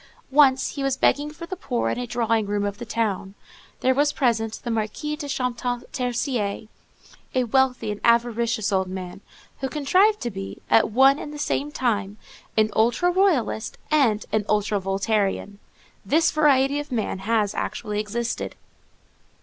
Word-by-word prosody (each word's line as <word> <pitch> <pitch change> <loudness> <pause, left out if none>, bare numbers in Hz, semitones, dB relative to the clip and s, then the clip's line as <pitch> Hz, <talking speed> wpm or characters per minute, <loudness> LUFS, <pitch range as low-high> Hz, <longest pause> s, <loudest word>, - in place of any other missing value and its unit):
Once 270 -2 +5
he 280 - -6
was 270 -1 0
begging 290 +2 +2
for 325 +3 -9
the 375 - -5
poor 250 - -2
in - - -3
a 245 - -4
drawing 230 -3 0
room 205 0 -1
of 205 +1 -4
the 240 - -7
town; 205 -3 -2 0.5
there 260 - +3
was 290 +2 +2
present 225 -5 0
the 240 - -3
Marquis 225 +7 -2
de 300 -1 -6
Champtercier, 245 -3 -2 0.7
a 255 - +3
wealthy 250 -2 +1
and 205 - -6
avaricious 235 -2 +2
old 190 -1 +1
man, 185 0 -7 0.4
who 265 - -2
contrived 370 +10 +3
to 240 - -3
be, 195 0 -7
at 225 - +5
one 270 +5 +5
and 295 - -6
the 300 - -8
same 295 0 -1
time, 210 -7 -1 0.4
an 215 0 +3
ultra 240 +11 +3
royalist 340 - +1
and 250 -9 +3
an 215 -1 +1
ultra 210 -1 +1
Voltairian. 195 +1 -1 0.4
This 320 +2 +3
variety 285 -2 +3
of 290 -1 -7
man 220 -5 -2
has 210 0 0
actually 210 0 -3
existed. 230 +3 -3
235 Hz, 160 wpm, -24 LUFS, 210-275 Hz, 0.7 s, Once